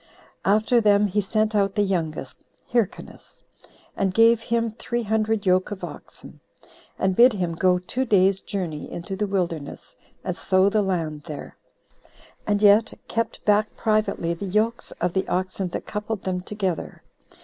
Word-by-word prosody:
After 220 Hz, +4 st, +3 dB
them 205 Hz, -1 st, +4 dB
he 205 Hz, +1 st, +1 dB
sent 215 Hz, +2 st, 0 dB
out 200 Hz, -2 st, +1 dB
the 205 Hz, -, +3 dB
youngest, 160 Hz, -8 st, -3 dB, 0.3 s
Hyrcanus, 235 Hz, -5 st, -3 dB, 0.5 s
and 195 Hz, -1 st, 0 dB
gave 230 Hz, 0 st, +6 dB
him 230 Hz, 0 st, 0 dB
three 235 Hz, +2 st, -3 dB
hundred 220 Hz, 0 st, 0 dB
yoke 185 Hz, 0 st, +3 dB
of 205 Hz, -2 st, -7 dB
oxen, -, -, -10 dB, 0.6 s
and 190 Hz, -1 st, +1 dB
bid 245 Hz, +3 st, +7 dB
him 180 Hz, -4 st, -2 dB
go 180 Hz, +2 st, +3 dB
two 195 Hz, +8 st, -2 dB
days' 195 Hz, -3 st, +3 dB
journey 170 Hz, -7 st, -5 dB
into 175 Hz, +3 st, -5 dB
the 205 Hz, +2 st, -1 dB
wilderness, 170 Hz, -7 st, -3 dB, 0.3 s
and 180 Hz, -, -3 dB
sow 190 Hz, +1 st, +3 dB
the 215 Hz, +1 st, +2 dB
land 165 Hz, -6 st, -2 dB
there, 150 Hz, -3 st, -8 dB, 0.9 s
and 205 Hz, 0 st, +1 dB
yet 210 Hz, +2 st, +5 dB
kept 230 Hz, -1 st, -3 dB
back 210 Hz, +1 st, +2 dB
privately 215 Hz, -6 st, 0 dB
the 170 Hz, +4 st, -6 dB
yokes 215 Hz, +5 st, 0 dB
of 175 Hz, 0 st, -2 dB
the 190 Hz, -, -1 dB
oxen 185 Hz, +1 st, -2 dB
that 175 Hz, -, -5 dB
coupled 210 Hz, -1 st, -4 dB
them 185 Hz, -1 st, -2 dB
together. 190 Hz, -3 st, -4 dB
200 Hz, 155 wpm, -24 LUFS, 185-215 Hz, 0.9 s, bid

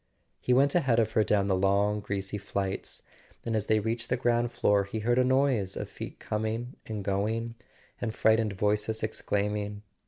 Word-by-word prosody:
He -, -, -1 dB
went 140 Hz, +3 st, +4 dB
ahead 135 Hz, -9 st, +3 dB
of 110 Hz, -1 st, +2 dB
her 110 Hz, -1 st, +3 dB
down 100 Hz, -2 st, +2 dB
the 95 Hz, -, +2 dB
long 100 Hz, +2 st, +2 dB
greasy 100 Hz, 0 st, -3 dB
flights, 100 Hz, -1 st, -3 dB, 0.4 s
and 115 Hz, -1 st, -1 dB
as 105 Hz, -2 st, -1 dB
they 110 Hz, 0 st, +4 dB
reached 115 Hz, +2 st, -3 dB
the 125 Hz, -, +1 dB
ground 120 Hz, -1 st, +1 dB
floor 105 Hz, -4 st, +3 dB
he 110 Hz, +2 st, -4 dB
heard 120 Hz, +3 st, +2 dB
a -, -, +5 dB
noise 130 Hz, -7 st, +2 dB
of -, -, -4 dB
feet -, -, -8 dB
coming 110 Hz, +4 st, -3 dB
and 105 Hz, -2 st, -4 dB
going, 110 Hz, +4 st, -1 dB, 0.5 s
and 115 Hz, -, -1 dB
frightened 110 Hz, -1 st, +2 dB
voices 105 Hz, +2 st, 0 dB
ex¬ 110 Hz, -, -3 dB
claiming. 105 Hz, 0 st, -1 dB
110 Hz, 185 wpm, -29 LUFS, 100-115 Hz, 0.5 s, a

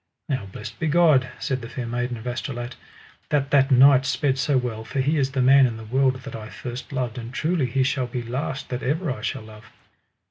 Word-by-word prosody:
Now 130 Hz, -, -2 dB
blessed 100 Hz, +2 st, -9 dB
be 160 Hz, -, 0 dB
God, 150 Hz, -5 st, +4 dB
said 130 Hz, -3 st, -2 dB
the 115 Hz, -, -8 dB
Fair 125 Hz, -, -5 dB
Maiden 120 Hz, +1 st, -2 dB
of 110 Hz, -, -11 dB
Astolat, 120 Hz, 0 st, -4 dB, 0.5 s
that 145 Hz, -1 st, 0 dB
that 140 Hz, -1 st, +4 dB
knight 135 Hz, 0 st, +7 dB
sped 140 Hz, -2 st, 0 dB
so 140 Hz, 0 st, +2 dB
well, 120 Hz, -3 st, -2 dB
for 135 Hz, -, -4 dB
he 145 Hz, +4 st, +2 dB
is 135 Hz, -2 st, 0 dB
the 130 Hz, -2 st, +1 dB
man 135 Hz, +1 st, +7 dB
in 115 Hz, -2 st, -5 dB
the 110 Hz, -, -9 dB
world 130 Hz, +2 st, +1 dB
that -, -, -7 dB
I 110 Hz, -1 st, -7 dB
first 125 Hz, +4 st, -7 dB
loved, 125 Hz, -3 st, -2 dB
and 115 Hz, 0 st, -7 dB
truly 155 Hz, +1 st, 0 dB
he 130 Hz, +2 st, +1 dB
shall 130 Hz, -1 st, 0 dB
be 120 Hz, 0 st, -4 dB
last 135 Hz, +3 st, -4 dB
that 125 Hz, 0 st, -3 dB
ever 150 Hz, +4 st, -1 dB
I 110 Hz, -, -5 dB
shall 110 Hz, -, -3 dB
love. 110 Hz, 0 st, -13 dB
130 Hz, 225 wpm, -24 LUFS, 120-140 Hz, 0.5 s, knight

